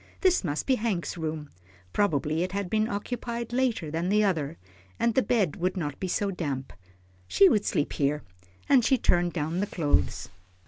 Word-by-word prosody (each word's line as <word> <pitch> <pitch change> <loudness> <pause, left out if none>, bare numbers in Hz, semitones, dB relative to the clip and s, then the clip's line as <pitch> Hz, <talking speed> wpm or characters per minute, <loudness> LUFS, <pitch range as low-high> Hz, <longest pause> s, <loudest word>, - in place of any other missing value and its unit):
This 370 - +3
must 150 -4 -2
be 260 -2 +2
Hank's 210 -6 -2
room, 155 -2 -4 0.5
probably 155 -5 +1
it 185 +1 -2
had 200 -2 -3
been 215 0 +2
occupied 235 +3 -4
later 240 -11 0
than 165 +3 -1
the 210 +1 +4
other, 165 -6 0 0.4
and 235 - +2
the 260 - +4
bed 210 - +1
would 185 +2 -1
not 145 -5 -3
be 190 - -2
so 200 +2 0
damp. 140 -7 -4 0.5
She 195 - +6
would 210 -1 +2
sleep 145 - 0
here, 145 +1 0 0.4
and 260 -4 +5
she 265 +3 +4
turned 175 -5 +2
down 160 +2 -2
the 205 - 0
clothes. 155 -7 0
185 Hz, 180 wpm, -27 LUFS, 155-215 Hz, 0.5 s, She